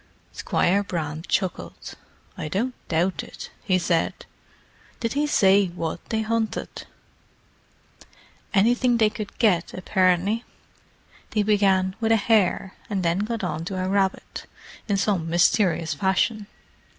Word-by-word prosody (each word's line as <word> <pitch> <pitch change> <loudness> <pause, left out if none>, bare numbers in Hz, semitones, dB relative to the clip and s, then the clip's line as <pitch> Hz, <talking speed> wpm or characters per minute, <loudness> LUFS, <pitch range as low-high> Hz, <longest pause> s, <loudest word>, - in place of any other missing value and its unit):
Squire 195 +3 +1
Brand 160 -4 -4
chuckled. 185 -3 -3 0.4
"I - - -5
don't 225 +11 -1
doubt 175 +3 0
it," - - -10
he 185 -3 +2
said. 170 -2 -1 0.7
"Did 230 -1 -2
he 295 +2 +1
say 195 -7 +4
what 170 -1 -5
they 220 -1 0
hunted?" 225 0 -3 1.6
"Anything 240 +4 +3
they 215 -2 +3
could 210 -2 -7
get, 190 -7 +2
apparently. 185 +4 +1 0.9
They 210 -1 +1
began 195 -3 +2
with 225 -1 +1
a - - +6
hare, 200 -3 +2 0.2
and 195 -3 -1
then 170 +2 +1
got 220 +1 -3
on 160 -3 -2
to 190 +1 -4
a 185 - -1
rabbit, 195 0 -1 0.4
in 200 -2 +1
some 190 -5 0
mysterious 170 -1 +2
fashion. 195 +5 0
195 Hz, 125 wpm, -24 LUFS, 180-215 Hz, 1.6 s, a